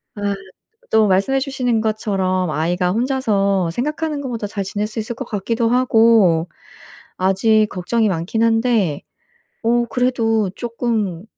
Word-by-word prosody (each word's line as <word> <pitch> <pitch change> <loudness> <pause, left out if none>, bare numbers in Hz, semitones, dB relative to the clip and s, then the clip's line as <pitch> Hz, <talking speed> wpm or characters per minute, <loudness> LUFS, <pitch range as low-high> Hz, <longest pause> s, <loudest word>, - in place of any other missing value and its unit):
아 205 -1 -1 0.6
또 220 -2 +4
말씀해 200 +9 +2
주시는 255 -4 -1
것처럼 195 -5 -1
아이가 175 +4 0
혼자서 205 -7 +1
생각하는 300 - -2
것보다 235 -6 -4
잘 200 -1 -4
지낼 205 +2 -3
수 220 +1 -5
있을 220 +2 -5
것 265 - -5
같기도 230 +2 -1
하고 225 -8 +4 0.7
아직 210 +4 +3
걱정이 210 +5 0
많긴 185 +6 -1
한데 225 - +2 0.6
어 240 +1 +2
그래도 225 -5 +1
쪼끔 225 -7 -2
220 Hz, 270 characters per minute, -19 LUFS, 195-240 Hz, 0.7 s, 또